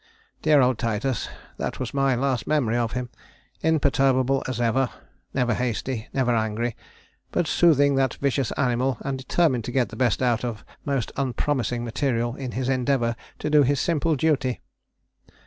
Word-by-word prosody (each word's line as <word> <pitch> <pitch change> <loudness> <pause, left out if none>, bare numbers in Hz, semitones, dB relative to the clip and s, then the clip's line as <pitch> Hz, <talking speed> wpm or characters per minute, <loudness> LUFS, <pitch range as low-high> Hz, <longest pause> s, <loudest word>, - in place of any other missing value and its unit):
"Dear 150 -2 +5
old 125 -2 +2
Titus 115 +3 -1 0.3
that - - -4
was 125 - -4
my 135 -2 +2
last 130 -1 -1
memory 135 -7 +1
of 120 -2 0
him. 125 -1 -4 0.5
Imperturbable 135 -4 +2
as 130 -2 -3
ever; 120 +2 +2 0.4
never 125 -3 +1
hasty, 120 0 -2
never 125 -3 +1
angry, 110 +1 -1 0.6
but 175 - +1
soothing 145 -3 +4
that 135 -2 +1
vicious 135 -3 0
animal, 125 -1 0
and 135 -1 -2
determined 130 -2 +1
to - - -4
get 125 -1 +1
the - - -9
best 125 -1 +1
out 120 -2 +1
of 115 -3 -4 0.2
most 135 -6 -1
unpromising 130 -3 -1
material 120 -1 -1
in 130 -3 -5
his 130 0 -2
endeavour 130 -2 +1 0.2
to 150 - -3
do 150 -1 +6
his 140 0 +2
simple 165 -1 +1
duty. 135 -4 +1
130 Hz, 160 wpm, -24 LUFS, 120-140 Hz, 0.6 s, do